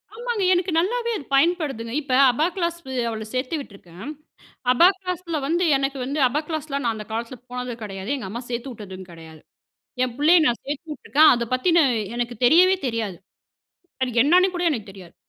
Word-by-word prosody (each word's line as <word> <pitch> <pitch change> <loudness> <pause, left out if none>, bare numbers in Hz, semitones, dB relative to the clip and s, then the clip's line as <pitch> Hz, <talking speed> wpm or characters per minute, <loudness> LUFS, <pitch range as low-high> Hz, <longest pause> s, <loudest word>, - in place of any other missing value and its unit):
ஆமாங்க. 475 -3 -2
எனக்கு 360 0 0
நல்லாவே 470 +6 -1
அது 285 - -10
பயன்படுதுங்க. 275 -7 +1
இப்ப, 280 -3 -8 0.2
அபாக்ளாஸ் 340 +5 -1 0.3
அவள 220 -1 -5
சேத்து 255 +5 -2
விட்டுருக்கேன். 200 - -10 0.6
அபாக்ளாஸ்ல 365 +1 +2
வந்து 340 +4 +1
எனக்கு 270 0 -2
வந்து 280 +4 -3
அபாக்ளாஸ்லாம் 295 +1 -1
நான் 230 -1 0
அந்த 210 -1 -7
காலத்துல 230 +3 -4
போனதும 250 -1 -5
கெடயாது. 195 0 -6
எங்க 250 -8 -6
அம்மா 235 +5 -5
சேத்து 240 +2 -4
உட்டதும் 190 -4 -10
கெடையாது. 160 -2 -13 0.6
என் 250 -2 -1
புள்ளைய 315 +5 +5
நான் 240 -1 +1
சேத்து 290 +3 -5
உட்டுருக்கேன். 300 +1 +4
அதை 240 -1 -2
பத்தின, 335 +7 +3 0.3
எனக்கு 240 0 -3
தெரியவே 360 +9 +6
தெரியாது. 225 -6 -3 0.9
அது 255 - +1
என்னான்னு 360 +7 +4
கூட 350 - -2
எனக்கு 225 -9 -4
தெரியாது. 185 -3 -14
270 Hz, 155 wpm, -23 LUFS, 230-340 Hz, 0.9 s, தெரியவே